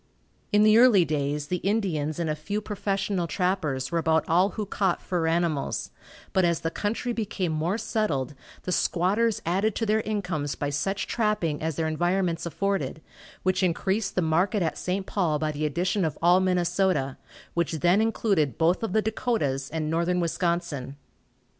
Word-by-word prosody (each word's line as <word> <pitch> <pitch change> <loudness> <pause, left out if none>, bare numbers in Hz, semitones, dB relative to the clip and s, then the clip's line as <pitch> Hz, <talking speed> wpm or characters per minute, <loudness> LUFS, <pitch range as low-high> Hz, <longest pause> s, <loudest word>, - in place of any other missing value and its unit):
In 210 0 +5
the 215 +1 +6
early 225 -8 +6
days 145 -1 -1
the 180 - 0
Indians 175 -7 -1
and 170 -2 -1
a 155 - 0
few 195 +8 -3
professional 200 -3 -2
trappers 155 -7 -1
were 170 - +1
about 160 0 +2
all 180 +4 +4
who 215 - -1
caught 190 -2 0
fur 175 -3 -1
animals, 165 -3 -1 0.4
but 190 - +3
as 170 -2 +1
the 165 - -2
country 230 +5 -2
became 210 -6 -2
more 160 +6 0
settled 185 - -1 0.3
the 185 - -3
squatters 200 +6 +1
added 195 +5 +1
to 225 - -1
their 215 +1 +2
incomes 175 - -2
by 145 0 -2
such 195 +8 -1
trapping 210 -10 0
as 160 -1 -2
their 160 +1 -1
environments 175 +1 0
afforded, 170 -4 -2 0.4
which 185 +1 +1
increased 190 +3 0
the 180 - +2
market 175 +5 +1
at 160 - -1
St. 190 +1 -2
Paul 170 -8 0
by 155 0 -1
the 150 +1 -1
addition 180 +6 0
of 155 -2 -1
all 175 +2 +5
Minnesota, 180 -6 +1 0.4
which 170 -2 0
then 180 +4 +4
included 200 - +1
both 170 +3 +2
of 225 -5 -2
the 220 - +2
Dakotas, 180 - -1
and 160 -1 -2
northern 170 +2 +1
Wisconsin. 170 -5 -1
175 Hz, 170 wpm, -26 LUFS, 160-200 Hz, 0.4 s, the